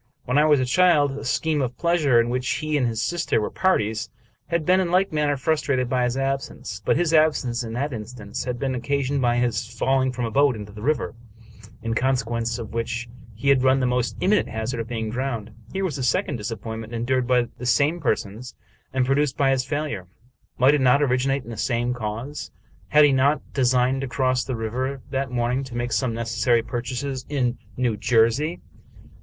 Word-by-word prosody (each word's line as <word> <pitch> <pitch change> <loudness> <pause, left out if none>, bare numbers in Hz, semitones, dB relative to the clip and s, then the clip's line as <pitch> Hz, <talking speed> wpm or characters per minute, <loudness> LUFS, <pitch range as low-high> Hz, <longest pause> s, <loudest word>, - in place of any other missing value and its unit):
When 125 +3 +2
I 150 - +5
was 150 -2 +5
a 130 - +1
child, 150 0 +4
a 140 +1 -6
scheme 150 +2 0
of 125 -1 -3
pleasure, 160 -8 +3
in 115 0 +2
which 125 +1 -1
he 155 0 -1
and 130 -4 +2
his 115 -1 -2
sister 165 +4 0
were 105 - -2
parties, 110 - 0 0.4
had 170 -2 -1
been 185 +3 +4
in 185 -2 0
like 185 0 +2
manner 150 -2 +1
frustrated 140 -3 0
by 125 -1 +2
his 125 +1 -1
absence; 135 -7 -3
but - - +2
his 170 -1 +1
absence, 145 -6 +2
in 115 -1 -6
that 140 +4 -2
instance, 110 -1 -6
had 125 -1 -2
been 135 +1 -1
occasioned 140 +2 -1
by 120 -1 +2
his 120 -2 0
falling 130 0 +1
from 125 -1 -3
a 115 - -3
boat 140 +1 +3
into 105 -1 -8
the 105 +1 -10
river, 150 +6 0 0.7
in 115 0 -1
consequence 120 -2 0
of 115 -3 -7
which 115 +1 -3 0.3
he 120 +6 -1
had 135 -2 +5
run 130 +1 +4
the 130 - +1
most 125 -1 0
imminent 205 +3 +2
hazard 115 +2 -3
of 115 - -3
being 110 -2 -3
drowned. 120 -3 -3 0.2
Here 195 0 -1
was 155 -6 -3
a - - -2
second 125 +3 0
disappointment 110 +1 -6
endured 125 +2 0
by 125 -1 +2
the 125 - -4
same 145 +7 +2
persons, 110 -1 -2 0.4
and 130 -1 +1
produced 135 +1 +1
by 135 -1 +3
his 130 -1 +1
failure. 145 -11 -3 0.5
Might 130 +3 +5
it 150 - +2
not 130 +3 +4
originate 135 0 +1
in 120 - -9
the 115 - -7
same 120 +2 0
cause? 120 +5 -5 0.4
Had 150 0 +6
he 145 - +4
not 135 +2 +1
designed 130 0 +2
to 135 - -3
cross 130 0 +1
the 130 - -3
river 125 +4 -3
that 135 -1 -1
morn 125 +1 0
ing - - -3
to 125 -2 -9
make 120 0 -2
some 115 +2 0
necessary 115 0 +1
purchases 125 +3 -4
in 125 -4 0 0.2
New 125 -3 +1
Jersey? 120 +9 +2
125 Hz, 205 wpm, -24 LUFS, 115-140 Hz, 0.7 s, Had